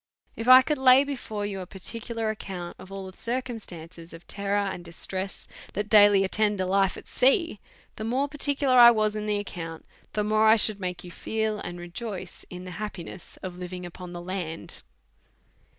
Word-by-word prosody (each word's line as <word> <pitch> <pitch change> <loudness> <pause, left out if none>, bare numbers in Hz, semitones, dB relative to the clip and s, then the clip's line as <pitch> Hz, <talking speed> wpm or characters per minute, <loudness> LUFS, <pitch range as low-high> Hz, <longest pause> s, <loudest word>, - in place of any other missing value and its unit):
If 230 - -5
I 255 0 +10
could 300 +1 -1
lay 260 +1 +7
before 245 -7 -4
you 200 -1 -4
a 185 - -7
particular 225 +3 -4
account 185 -5 -7
of 190 - -12
all 195 -1 -6
the - - -24
circumstances 190 -9 -4
of 165 +1 -12
terror 200 0 -1
and 185 -2 -5
distress 185 +3 -5 0.3
that 205 +2 -3
daily 205 -2 +7
at 190 - -2
tend 210 -2 +2
a 185 - +1
life 195 +1 +2
at - - -11
sea, 270 - +2 0.4
the 215 - -5
more 255 +5 0
particular 285 -2 +1
1 240 -1 +9
was 215 -1 +1
in 215 0 -3
the 210 - +1
ac 205 - -1
count, 165 -3 -7 0.3
the 210 - 0
more 215 +1 +3
I 220 - +8
should 215 -2 +3
make 180 -2 -4
you 175 - -9
feel 220 +3 -2
and 175 -2 -6
rejoice 185 +1 -7
in 180 0 -8
the 185 - -8
happiness 190 -4 -7
of 180 -1 -6
living 180 0 -6
upon 175 0 -9
the 175 0 -7
land. 175 -3 -5
205 Hz, 195 wpm, -26 LUFS, 180-225 Hz, 0.4 s, I